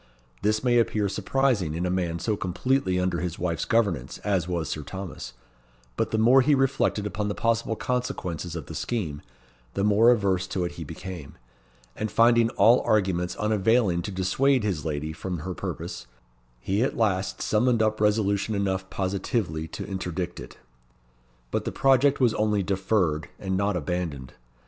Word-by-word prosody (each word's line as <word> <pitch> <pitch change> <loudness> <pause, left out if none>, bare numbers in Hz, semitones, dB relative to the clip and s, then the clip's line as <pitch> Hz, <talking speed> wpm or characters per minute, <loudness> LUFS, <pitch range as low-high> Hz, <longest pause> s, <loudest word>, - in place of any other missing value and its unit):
This 110 +2 +1
may 120 -1 +4
appear 110 -3 +1
surprising 100 - 0
in 85 +2 -2
a 90 - 0
man 90 -2 -1
so 105 +5 -1
completely 95 +1 0
under 90 -2 0
his 90 -1 -3
wife's 85 -2 -2
governance 100 - 0
as 95 -4 0
was 85 -3 -2
Sir 75 - -3
Thomas; 90 -6 -7 0.6
but - - 0
the 110 - -1
more 120 +5 +6
he 145 +3 +4
reflected 135 -6 +1
upon 105 +1 -2
the 105 - -2
possible 115 -1 0
consequences 90 -10 -3
of 80 -5 -5
the - - -9
scheme, 85 -12 -3 0.5
the 100 - 0
more 105 +3 +5
averse 95 -6 +2
to 95 -1 -2
it 85 - -3
he 85 - -7
became; 80 -1 -8 0.6
and 110 - -3
finding 115 +1 +4
all 115 +5 +6
arguments 95 -4 +1
unavailing 105 -3 +2
to 85 - -5
dissuade 115 +8 +2
his 95 -8 -1
lady 75 0 -3
from 90 +2 -4
her 90 +3 -4
purpose, 65 -5 -6 0.5
he 95 - -1
at 130 - 0
last 95 -4 0
summoned 115 +1 +2
up 110 0 0
resolution 105 0 +1
enough 95 -1 -1
positively 95 -4 -2
to - - -6
interdict 90 -2 -4
it. - - -10 0.9
But - - -1
the - - -3
project 135 +1 +3
was 120 -4 +3
only 105 -2 +1
deferred, 95 -4 0
and 95 -1 -2
not 100 0 +1
abandoned. 80 -5 -4
95 Hz, 165 wpm, -26 LUFS, 90-110 Hz, 0.9 s, more